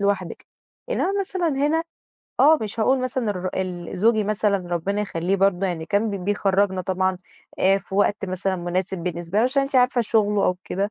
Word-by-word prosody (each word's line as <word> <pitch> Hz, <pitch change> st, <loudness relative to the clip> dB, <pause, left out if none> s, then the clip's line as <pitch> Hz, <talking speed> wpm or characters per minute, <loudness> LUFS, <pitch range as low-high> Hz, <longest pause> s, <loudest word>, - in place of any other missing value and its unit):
لوحدِك، 200 Hz, -3 st, -2 dB, 0.4 s
إنما 390 Hz, -, 0 dB
مثلًا 370 Hz, -3 st, -1 dB
هنا 295 Hz, +3 st, +1 dB, 0.6 s
آه 310 Hz, +3 st, +6 dB
مش 215 Hz, +1 st, -3 dB
هاقول 260 Hz, +4 st, +3 dB
مثلًا 255 Hz, -3 st, -1 dB
الر 185 Hz, -1 st, -3 dB
ال 180 Hz, -1 st, -4 dB
زوجي 220 Hz, +2 st, +3 dB
مثلًا 210 Hz, -1 st, +1 dB, 0.2 s
ربنا 200 Hz, +5 st, -1 dB
يخلّيه 180 Hz, 0 st, -1 dB
برضه 195 Hz, -1 st, +2 dB
يعني 165 Hz, -3 st, -4 dB
كان 210 Hz, +2 st, +1 dB
ب 195 Hz, -3 st, -5 dB
بيخرجنا 195 Hz, -1 st, +1 dB
طبعًا 185 Hz, +1 st, 0 dB, 0.4 s
آآ 195 Hz, +1 st, +4 dB
في 190 Hz, -, -10 dB
وقت 205 Hz, 0 st, +1 dB
مثلًا 185 Hz, 0 st, -2 dB
مناسب 180 Hz, +2 st, -2 dB
بالنسبة 175 Hz, +2 st, -3 dB
له 230 Hz, -, +4 dB
عشان 275 Hz, +2 st, +2 dB
أنتِ 275 Hz, 0 st, -1 dB
عارفة 250 Hz, 0 st, +4 dB
شغله 210 Hz, -3 st, +2 dB
أو 180 Hz, -, +1 dB
كده. 200 Hz, +3 st, -2 dB
200 Hz, 180 wpm, -23 LUFS, 185-225 Hz, 0.6 s, آه